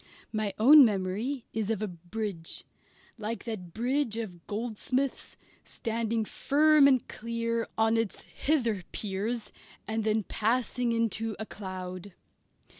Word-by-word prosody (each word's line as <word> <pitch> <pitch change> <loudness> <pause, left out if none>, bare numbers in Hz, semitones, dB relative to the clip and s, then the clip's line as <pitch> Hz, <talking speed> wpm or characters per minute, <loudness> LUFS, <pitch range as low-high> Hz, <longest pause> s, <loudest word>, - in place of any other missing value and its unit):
My 215 -2 0
own 280 +7 +9
memory 215 +5 0
is 220 -1 -1
of 225 -3 0
a - - 0
bridge; 180 0 -4 0.6
like 220 +2 -3
that 200 -7 -5
bridge 240 - 0
of 180 -7 -6
Goldsmith's, 245 +5 -2 0.3
standing 225 -1 -2
firm 300 +4 +5
and 260 -3 +3
clear 230 0 -2
on 225 +1 +3
its 225 -3 -2
hither 235 -10 0
piers 210 +3 -2 0.4
and 220 +1 -1
then 215 0 +1
passing 240 +3 0
into 225 -1 0
a 220 - -4
cloud. 185 -2 -7
225 Hz, 120 wpm, -29 LUFS, 205-235 Hz, 0.6 s, own